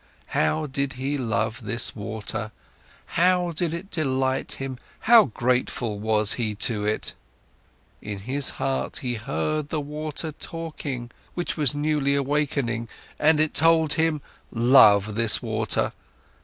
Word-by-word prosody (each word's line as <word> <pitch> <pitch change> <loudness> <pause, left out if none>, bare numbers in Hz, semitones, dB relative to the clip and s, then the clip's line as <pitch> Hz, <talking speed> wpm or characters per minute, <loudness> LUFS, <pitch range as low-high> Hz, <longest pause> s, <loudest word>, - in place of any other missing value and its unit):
How 75 - +1
did 140 -1 -2
he 135 +3 -3
love 115 -3 -2
this 115 +3 +3
water, 110 +1 -5 0.5
how 180 0 +2
did 165 0 -2
it 170 +4 -6
delight 130 -3 0
him, 135 -2 -5 0.2
how 230 -1 +7
grateful 120 -3 -1
was 110 -1 +2
he 110 -4 -2
to 105 0 +1
it! 105 - -1 0.9
In 100 -2 -6
his 135 +5 -1
heart 135 0 -2
he 125 -1 -1
heard 140 +5 -2
the 155 - -1
voice 150 +1 -5 0.2
talking, 145 -7 -5 0.2
which 175 - -2
was 145 -3 +2
newly 145 -1 +1
awaking, 140 -5 -1 0.3
and 155 0 +4
it 155 0 +2
told 160 -1 +5
him: 160 -2 0 0.3
Love 110 -4 +5
this 115 0 +4
water! 110 -2 -1
135 Hz, 130 wpm, -24 LUFS, 115-155 Hz, 0.9 s, how